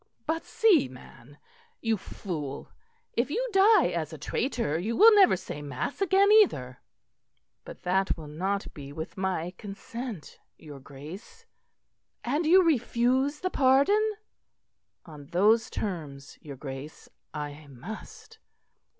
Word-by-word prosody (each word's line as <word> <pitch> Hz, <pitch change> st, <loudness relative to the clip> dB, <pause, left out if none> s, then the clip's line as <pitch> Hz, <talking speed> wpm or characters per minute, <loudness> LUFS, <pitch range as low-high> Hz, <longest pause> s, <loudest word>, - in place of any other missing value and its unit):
"But, 325 Hz, +1 st, -2 dB
see 440 Hz, -, +3 dB
man, 130 Hz, +2 st, -15 dB, 0.4 s
you 225 Hz, -1 st, 0 dB
fool; 155 Hz, -8 st, -6 dB, 0.4 s
if 240 Hz, +4 st, 0 dB
you -, -, -1 dB
die 410 Hz, +3 st, +5 dB
as -, -, -3 dB
a -, -, -8 dB
traitor 230 Hz, -, -2 dB
you 220 Hz, +6 st, -2 dB
will 445 Hz, +3 st, +8 dB
never 390 Hz, -, +6 dB
say 175 Hz, -5 st, -7 dB
mass 145 Hz, -, -5 dB
again 390 Hz, +2 st, +4 dB
either." 135 Hz, -, +3 dB, 0.8 s
"But -, -, -11 dB
that 190 Hz, +1 st, +1 dB
will 160 Hz, -, -9 dB
not 190 Hz, +7 st, -3 dB
be 140 Hz, -1 st, -9 dB
with 160 Hz, +2 st, -7 dB
my 185 Hz, -3 st, -2 dB
consent, 215 Hz, -, -8 dB, 0.2 s
your 145 Hz, -3 st, -11 dB
Grace." 160 Hz, -, -12 dB, 0.8 s
"And 295 Hz, +6 st, 0 dB
you 370 Hz, +3 st, +7 dB
refuse 265 Hz, -1 st, +1 dB
the 370 Hz, -, -2 dB
pardon?" 340 Hz, +12 st, +3 dB, 0.9 s
"On 150 Hz, -4 st, -12 dB
those 215 Hz, +8 st, +3 dB
terms, 150 Hz, -9 st, -6 dB
your 145 Hz, -2 st, -9 dB
Grace, 135 Hz, +2 st, -9 dB, 0.2 s
I 150 Hz, 0 st, -7 dB
must." 220 Hz, -, -11 dB
200 Hz, 125 wpm, -27 LUFS, -, 0.9 s, will